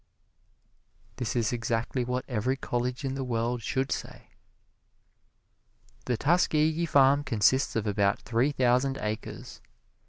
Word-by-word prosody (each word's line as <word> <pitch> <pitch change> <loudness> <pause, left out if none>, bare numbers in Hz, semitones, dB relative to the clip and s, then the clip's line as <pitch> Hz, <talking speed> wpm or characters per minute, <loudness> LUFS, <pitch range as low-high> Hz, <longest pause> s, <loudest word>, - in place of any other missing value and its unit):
This 110 -5 -3
is 115 -1 +1
exactly 115 +1 -1
what 125 +1 -3
every 125 +2 -1
college 125 +2 -3
in 135 - -2
the 135 0 -3
world 120 0 -1
should 130 +5 -2
say. - - -6 1.8
The 125 -2 0
Tuskegee 160 +2 +2
farm 140 0 +4
consists 130 +2 +2
of 115 -1 -1
about 100 -1 +1
three 120 +4 +1
thousand 130 0 +2
acres. 105 0 -6
125 Hz, 120 wpm, -28 LUFS, 115-135 Hz, 1.8 s, farm